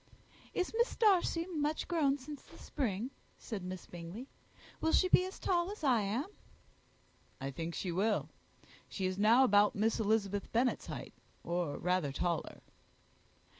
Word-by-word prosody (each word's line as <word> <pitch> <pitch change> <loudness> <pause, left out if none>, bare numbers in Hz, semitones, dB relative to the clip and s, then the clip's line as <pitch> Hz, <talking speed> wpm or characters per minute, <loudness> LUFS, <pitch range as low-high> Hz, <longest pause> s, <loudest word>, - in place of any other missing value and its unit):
"Is 365 +2 -1
Miss 475 +2 +2
Darcy 365 -6 +3
much 310 -4 -1
grown 295 -5 +2
since 285 +1 -8
the - - -16
spring?" 240 -3 -2 0.3
said 210 -6 -6
Miss 185 0 -6
Bingley: 175 +9 -8 0.5
"will 320 - +1
she 370 - +5
be 365 - +5
as 375 - -9
tall 350 -1 +1
as 415 -5 -9
I 250 -6 +4
am?" 215 +8 -1 1.1
"I 135 +1 -3
think 165 +4 -4
she 185 - -2
will. 205 +5 +1 0.6
She 190 - -3
is 185 +1 -1
now 230 +5 +6
about 205 -4 +5
Miss 220 +3 +1
Elizabeth 205 -2 0
Bennet's 245 +2 +1
height, - - -6 0.3
or 170 -3 -1
rather 180 -5 0
taller." 170 +4 -2
220 Hz, 150 wpm, -34 LUFS, 185-300 Hz, 1.1 s, now